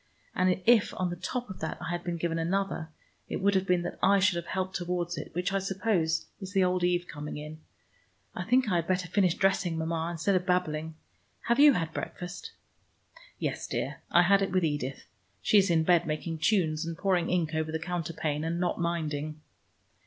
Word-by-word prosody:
And 185 Hz, 0 st, +1 dB
if 230 Hz, -3 st, +4 dB
on 180 Hz, -1 st, 0 dB
the -, -, -3 dB
top 240 Hz, +8 st, -4 dB
of 190 Hz, -, -9 dB
that 160 Hz, -, -3 dB
I -, -, -4 dB
had 175 Hz, 0 st, -3 dB
been 175 Hz, -1 st, -3 dB
given 165 Hz, 0 st, -1 dB
another, 175 Hz, -1 st, -1 dB, 0.4 s
it -, -, -2 dB
would 200 Hz, +1 st, +3 dB
have 190 Hz, 0 st, +1 dB
been 180 Hz, -1 st, +2 dB
that 175 Hz, -, -5 dB
I 200 Hz, +1 st, +5 dB
should 190 Hz, -2 st, +3 dB
have 170 Hz, -, -5 dB
helped 185 Hz, 0 st, -2 dB
towards 175 Hz, -1 st, -2 dB
it, -, -, -6 dB
which 180 Hz, +3 st, -1 dB
I 195 Hz, -, +2 dB
suppose 190 Hz, -4 st, 0 dB
is 190 Hz, -1 st, -7 dB
the 195 Hz, -2 st, +4 dB
old 180 Hz, 0 st, +1 dB
Eve 175 Hz, 0 st, +2 dB
coming 150 Hz, 0 st, -6 dB
in. 150 Hz, +1 st, -8 dB, 0.7 s
I 180 Hz, -, -4 dB
think 250 Hz, +5 st, +3 dB
I 180 Hz, -4 st, +2 dB
had 170 Hz, -, -1 dB
better 185 Hz, -1 st, 0 dB
finish 180 Hz, -1 st, +2 dB
dressing, 190 Hz, -4 st, +1 dB
Mama, 160 Hz, 0 st, -1 dB
instead 175 Hz, +4 st, 0 dB
of 185 Hz, -1 st, +2 dB
babbling. 160 Hz, -4 st, -1 dB, 0.5 s
Have 235 Hz, +3 st, +1 dB
you 290 Hz, 0 st, +8 dB
had 165 Hz, -6 st, -2 dB
breakfast?" 180 Hz, 0 st, -6 dB, 0.9 s
"Yes, -, -, -3 dB
dear, -, -, -3 dB
I 175 Hz, -, +5 dB
had 195 Hz, +3 st, +4 dB
it 195 Hz, -, 0 dB
with 185 Hz, -2 st, +2 dB
Edith. 145 Hz, -3 st, -3 dB, 0.3 s
She 210 Hz, -, +5 dB
is 195 Hz, 0 st, +2 dB
in 165 Hz, -2 st, +3 dB
bed 175 Hz, 0 st, +3 dB
making 160 Hz, +1 st, -3 dB
tunes 160 Hz, -4 st, +2 dB
and 165 Hz, 0 st, -5 dB
pouring 180 Hz, -3 st, +1 dB
ink 170 Hz, -3 st, 0 dB
over 160 Hz, 0 st, -1 dB
the 160 Hz, -, -1 dB
counterpane, 160 Hz, -3 st, -3 dB
and 165 Hz, +1 st, -2 dB
not 175 Hz, -1 st, -1 dB
minding." 155 Hz, -3 st, -2 dB
175 Hz, 205 wpm, -29 LUFS, 160-190 Hz, 0.9 s, you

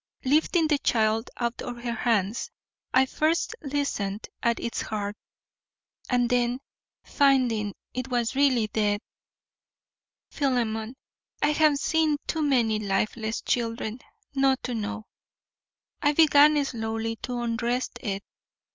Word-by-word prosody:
Lifting 315 Hz, +4 st, +3 dB
the 300 Hz, -2 st, +2 dB
child 220 Hz, -1 st, +1 dB
out 235 Hz, -1 st, -2 dB
of 245 Hz, -1 st, -5 dB
her 240 Hz, -, -1 dB
hands, 220 Hz, -2 st, 0 dB, 0.4 s
I 260 Hz, +1 st, +5 dB
first 310 Hz, +5 st, 0 dB
listened 270 Hz, -8 st, -2 dB
at 235 Hz, -1 st, +1 dB
its 235 Hz, -, -3 dB
heart, 205 Hz, -1 st, -3 dB, 0.9 s
and 245 Hz, -1 st, +2 dB
then, 245 Hz, +1 st, +1 dB, 0.4 s
finding 245 Hz, -8 st, +2 dB, 0.2 s
it 255 Hz, 0 st, -3 dB
was 245 Hz, -1 st, -1 dB
really 265 Hz, -5 st, +3 dB
dead, 210 Hz, -1 st, 0 dB, 1.3 s
Philemon, 240 Hz, -4 st, -1 dB, 0.5 s
I 295 Hz, -, +4 dB
have 300 Hz, -1 st, +4 dB
seen 310 Hz, 0 st, +2 dB
too 320 Hz, -, -2 dB
many 240 Hz, -7 st, +2 dB
lifeless 215 Hz, +2 st, -1 dB
children 230 Hz, -1 st, -1 dB, 0.3 s
not 270 Hz, -1 st, +2 dB
to 250 Hz, -, -3 dB
know, 220 Hz, 0 st, -4 dB, 1.0 s
I 290 Hz, -, +3 dB
began 295 Hz, -1 st, +6 dB
slowly 225 Hz, -2 st, -3 dB
to 245 Hz, +1 st, -4 dB
undress 240 Hz, +1 st, -1 dB
it. 200 Hz, -4 st, -3 dB
240 Hz, 120 wpm, -26 LUFS, 220-275 Hz, 1.3 s, began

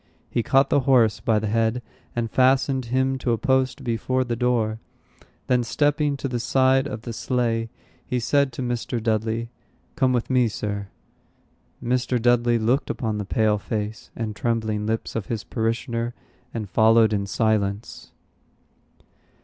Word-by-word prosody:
He 120 Hz, -, +1 dB
caught 135 Hz, +3 st, +3 dB
the -, -, +5 dB
horse 115 Hz, -5 st, +4 dB
by 110 Hz, -2 st, +1 dB
the 105 Hz, -, -1 dB
head, 115 Hz, +3 st, 0 dB, 0.3 s
and 115 Hz, -2 st, -2 dB
fastened 130 Hz, 0 st, +3 dB
him 130 Hz, +2 st, 0 dB
to 120 Hz, -2 st, 0 dB
a -, -, 0 dB
post 130 Hz, +2 st, +1 dB
before 130 Hz, +2 st, 0 dB
the 120 Hz, -2 st, -2 dB
door. 115 Hz, -3 st, 0 dB, 0.7 s
Then 125 Hz, -1 st, +2 dB
stepping 145 Hz, +3 st, +1 dB
to 135 Hz, -, -3 dB
the 120 Hz, -2 st, -2 dB
side 130 Hz, +2 st, +3 dB
of 110 Hz, -5 st, -6 dB
the 120 Hz, -, -5 dB
sleigh, 115 Hz, -1 st, -1 dB, 0.3 s
he 125 Hz, -, -2 dB
said 140 Hz, +3 st, +2 dB
to 130 Hz, -, -4 dB
Mr. 120 Hz, 0 st, -2 dB
Dudley, 110 Hz, +1 st, -1 dB, 0.4 s
"Come 130 Hz, -4 st, +2 dB
with 120 Hz, -2 st, 0 dB
me, 125 Hz, -2 st, +3 dB
Sir." 100 Hz, -2 st, -4 dB, 1.0 s
Mr. 125 Hz, 0 st, 0 dB
Dudley 120 Hz, 0 st, +3 dB
looked 120 Hz, +5 st, +1 dB
upon 110 Hz, -3 st, -2 dB
the 105 Hz, -, -3 dB
pale 105 Hz, 0 st, +1 dB
face 105 Hz, +1 st, -4 dB
and 110 Hz, -2 st, -4 dB
trembling 110 Hz, -2 st, -1 dB
lips 110 Hz, 0 st, -2 dB
of 115 Hz, -4 st, -3 dB
his 110 Hz, -3 st, -3 dB
parishioner, 115 Hz, +1 st, -2 dB, 0.4 s
and 110 Hz, -3 st, -4 dB
followed 110 Hz, +1 st, +4 dB
in 100 Hz, -1 st, -1 dB
silence. 105 Hz, -1 st, -1 dB
115 Hz, 155 wpm, -24 LUFS, 110-130 Hz, 1.0 s, the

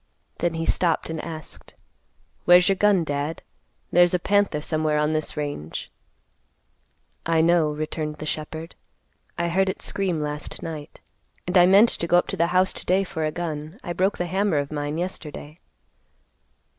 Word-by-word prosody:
Then 175 Hz, -1 st, 0 dB
he 165 Hz, 0 st, -2 dB
stopped 165 Hz, -1 st, +1 dB
and 160 Hz, -1 st, -4 dB
asked, 160 Hz, -2 st, -8 dB, 0.7 s
"Where's 180 Hz, 0 st, +7 dB
your 195 Hz, -, +3 dB
gun, 200 Hz, -2 st, +3 dB
Dad? 145 Hz, +1 st, -3 dB, 0.5 s
There's 175 Hz, +1 st, +5 dB
a -, -, +4 dB
panther 200 Hz, -3 st, +1 dB
somewhere 155 Hz, 0 st, 0 dB
on 150 Hz, +1 st, +1 dB
this 155 Hz, 0 st, -2 dB
range." 145 Hz, -, -5 dB, 1.3 s
"I 165 Hz, -1 st, +1 dB
know," 165 Hz, -1 st, +3 dB
returned 150 Hz, 0 st, -3 dB
the 155 Hz, -, -6 dB
shepherd; 155 Hz, +2 st, -5 dB, 0.6 s
"I 170 Hz, 0 st, 0 dB
heard 190 Hz, +2 st, +2 dB
it -, -, -4 dB
scream 185 Hz, -5 st, -1 dB
last 150 Hz, 0 st, -5 dB
night; 155 Hz, -3 st, -7 dB, 0.4 s
and 180 Hz, -, -3 dB
I 180 Hz, -1 st, +7 dB
meant 200 Hz, +5 st, +7 dB
to 170 Hz, -, -2 dB
go 175 Hz, -, +5 dB
up 175 Hz, -, +3 dB
to -, -, -1 dB
the 170 Hz, -, +2 dB
house 185 Hz, +1 st, +2 dB
to -, -, -8 dB
day 190 Hz, +2 st, +3 dB
for 160 Hz, -4 st, -4 dB
a 155 Hz, -, -1 dB
gun. 160 Hz, +2 st, -5 dB
I 175 Hz, -, -3 dB
broke 190 Hz, +3 st, +1 dB
the 175 Hz, -, -1 dB
hammer 190 Hz, -1 st, 0 dB
of 145 Hz, 0 st, -2 dB
mine 145 Hz, 0 st, -3 dB
yesterday." 165 Hz, -3 st, -6 dB
165 Hz, 170 wpm, -24 LUFS, 155-180 Hz, 1.3 s, Where's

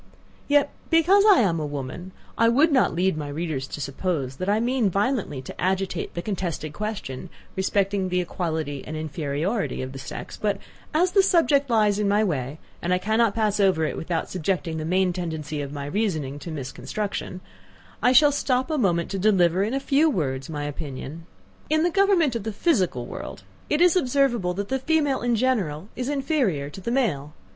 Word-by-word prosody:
Yet, 290 Hz, 0 st, +3 dB, 0.2 s
because 350 Hz, +5 st, +5 dB
I 375 Hz, -, +6 dB
am 170 Hz, -6 st, +1 dB
a 155 Hz, -, -2 dB
woman, 145 Hz, +6 st, -6 dB, 0.2 s
I 230 Hz, 0 st, +4 dB
would 290 Hz, +7 st, +4 dB
not 260 Hz, -, +3 dB
lead 185 Hz, 0 st, +2 dB
my 150 Hz, -1 st, -4 dB
readers 145 Hz, -3 st, -3 dB
to -, -, -7 dB
suppose, 140 Hz, -2 st, -2 dB
that 185 Hz, +5 st, -2 dB
I 210 Hz, +2 st, +3 dB
mean 240 Hz, -2 st, +1 dB
violently 200 Hz, -, -1 dB
to -, -, -9 dB
agitate 190 Hz, +1 st, -1 dB
the 170 Hz, -, -3 dB
contested 175 Hz, -6 st, -3 dB
question 185 Hz, -7 st, -5 dB, 0.3 s
respecting 195 Hz, 0 st, 0 dB
the 180 Hz, 0 st, +1 dB
equality 160 Hz, -5 st, -3 dB
and 155 Hz, -, -6 dB
inferiority 155 Hz, -, -2 dB
of 130 Hz, -, -5 dB
the 135 Hz, -, -8 dB
sex; -, -, -7 dB
but 205 Hz, -2 st, 0 dB, 0.3 s
as 350 Hz, +4 st, +2 dB
the 395 Hz, -, +5 dB
subject 315 Hz, -7 st, +3 dB
lies 210 Hz, -3 st, +3 dB
in 210 Hz, -, +1 dB
my 205 Hz, +2 st, +3 dB
way, 145 Hz, -6 st, -2 dB, 0.2 s
and 175 Hz, -, -1 dB
I 180 Hz, -, +4 dB
cannot 220 Hz, +3 st, +1 dB
pass 215 Hz, -2 st, +1 dB
it -, -, +4 dB
over 160 Hz, -5 st, +2 dB
without 165 Hz, 0 st, -2 dB
subjecting 175 Hz, -2 st, -2 dB
the 155 Hz, -, -3 dB
main 185 Hz, +2 st, +2 dB
tendency 160 Hz, -4 st, -4 dB
of 140 Hz, -1 st, -5 dB
my 145 Hz, -1 st, -5 dB
reasoning 155 Hz, -6 st, -2 dB
to 170 Hz, -, -8 dB
misconstruction, 180 Hz, +7 st, -4 dB, 0.6 s
I 250 Hz, -, +4 dB
shall 290 Hz, +3 st, +7 dB
stop 260 Hz, 0 st, 0 dB
a 305 Hz, -, 0 dB
moment 170 Hz, -6 st, +1 dB
to 195 Hz, -, -2 dB
deliver, 185 Hz, -3 st, +3 dB
in 220 Hz, +6 st, 0 dB
a -, -, +1 dB
few 290 Hz, +3 st, +3 dB
words, 135 Hz, -, -2 dB
my 150 Hz, -2 st, -4 dB
opinion. 145 Hz, +2 st, -6 dB, 0.4 s
In 310 Hz, +1 st, +3 dB
the 350 Hz, -, +2 dB
government 375 Hz, -8 st, +3 dB
of 230 Hz, -, -1 dB
the 220 Hz, +2 st, -4 dB
physical 190 Hz, -, +1 dB
world, -, -, -8 dB, 0.3 s
it 300 Hz, -, +1 dB
is 355 Hz, -1 st, +5 dB
observable 250 Hz, -, +1 dB
that 200 Hz, +1 st, -4 dB
the 265 Hz, -, 0 dB
female, 290 Hz, -1 st, +1 dB
in 240 Hz, -1 st, +1 dB
general, 205 Hz, -9 st, 0 dB
is 255 Hz, +1 st, -3 dB
inferior 265 Hz, -, 0 dB
to 190 Hz, -, -9 dB
the 210 Hz, -, -3 dB
male. 155 Hz, -, 0 dB
190 Hz, 190 wpm, -24 LUFS, 155-250 Hz, 0.6 s, shall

